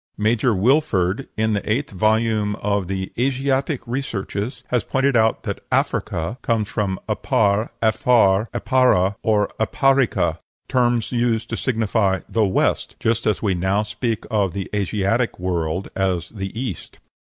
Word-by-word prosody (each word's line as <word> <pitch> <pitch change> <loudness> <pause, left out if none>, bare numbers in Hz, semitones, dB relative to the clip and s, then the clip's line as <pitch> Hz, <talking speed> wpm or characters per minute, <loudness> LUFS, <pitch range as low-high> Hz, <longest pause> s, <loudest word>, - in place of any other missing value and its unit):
Major 110 +2 +2
Wilford, 110 - +1
in 110 0 +1
the 105 +1 -2
eighth 135 +6 -1
volume 110 +1 +1
of 100 -3 -1
the 95 0 -3
"Asiatic 135 +2 0
Researches," 115 -3 -4
has 125 -3 +1
pointed 135 0 +1
out 110 -1 +2
that - - -4
Africa 95 +11 -1
comes 110 -3 0
from 100 -4 -2
Apar, 105 -1 +1
Aphar, 110 -2 +3
Apara, 115 -8 +2
or 105 -2 +2
Aparica, 135 +5 +2 0.3
terms 120 -3 +1
used 120 -2 0
to - - 0
signify 110 -5 0
"the 115 - +1
West," 95 - 0
just 115 +1 0
as 105 0 0
we 100 -3 +2
now 95 +4 +1
speak 105 +1 -3
of 100 -5 +1
the 95 -1 -5
Asiatic 105 +4 0
world 90 -1 -2
as 95 -3 -1
"the 95 +1 -6
East." 120 -9 -5
110 Hz, 140 wpm, -21 LUFS, 100-120 Hz, 0.3 s, Aphar